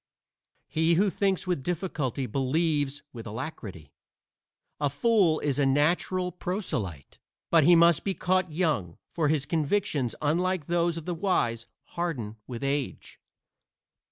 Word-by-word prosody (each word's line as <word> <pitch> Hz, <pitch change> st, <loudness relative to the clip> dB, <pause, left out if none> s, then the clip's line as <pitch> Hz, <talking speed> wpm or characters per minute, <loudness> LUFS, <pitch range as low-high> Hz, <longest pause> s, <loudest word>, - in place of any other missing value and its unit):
He 160 Hz, +2 st, +2 dB
who 195 Hz, +3 st, +3 dB
thinks 195 Hz, -1 st, 0 dB
with 180 Hz, -7 st, -1 dB
difficulty 155 Hz, -, -2 dB
believes 145 Hz, +3 st, 0 dB
with 115 Hz, -2 st, -8 dB
alacrity. 105 Hz, -, -7 dB, 0.9 s
A 145 Hz, -1 st, +1 dB
fool 175 Hz, -, +3 dB
is 145 Hz, -2 st, 0 dB
a 140 Hz, -, +3 dB
natural 175 Hz, +6 st, +1 dB
proselyte, 165 Hz, -, -4 dB, 0.3 s
but 165 Hz, -4 st, +5 dB
he 175 Hz, +2 st, +7 dB
must 170 Hz, -2 st, +5 dB
be 195 Hz, -2 st, -1 dB
caught 185 Hz, -1 st, +1 dB
young, 150 Hz, -, -1 dB
for 160 Hz, -3 st, 0 dB
his 145 Hz, -2 st, +1 dB
convictions, 150 Hz, -, 0 dB
unlike 175 Hz, +2 st, 0 dB
those 170 Hz, 0 st, +1 dB
of 165 Hz, -, -7 dB
the 180 Hz, -, -2 dB
wise, 120 Hz, -, 0 dB, 0.2 s
harden 130 Hz, -12 st, -4 dB
with 120 Hz, 0 st, -6 dB
age. 140 Hz, -1 st, -3 dB
155 Hz, 130 wpm, -27 LUFS, 135-175 Hz, 0.9 s, he